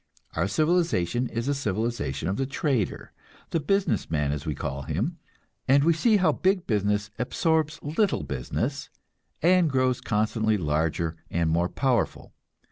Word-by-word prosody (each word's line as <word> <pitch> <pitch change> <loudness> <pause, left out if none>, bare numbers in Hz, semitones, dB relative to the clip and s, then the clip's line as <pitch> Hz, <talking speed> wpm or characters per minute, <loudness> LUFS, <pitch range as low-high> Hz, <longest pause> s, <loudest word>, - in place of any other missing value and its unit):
Our - - +1
civilization 155 - +1
is 115 +2 -3
a 145 - +2
civilization 110 - -2
of 95 - -1
the 135 - -1
trader 135 -6 -1 0.4
the 165 - +1
business 195 - 0
man, 75 -3 0
as 75 0 -4
we 75 - -1
call 70 0 -4
him; - - -2 0.5
and 140 +2 +5
we 165 +2 +4
see 215 +7 +3
how 185 - +3
big 190 -1 +1
business 105 -1 0
absorbs 155 +3 0
little 180 +7 +1
business, 65 -3 -3 0.5
and 180 -1 +5
grows 130 -2 +1
constantly 110 0 +1
larger 80 0 -1
and 85 -1 0
more 85 +2 +1
powerful. 125 -6 -1
115 Hz, 145 wpm, -26 LUFS, -, 0.5 s, and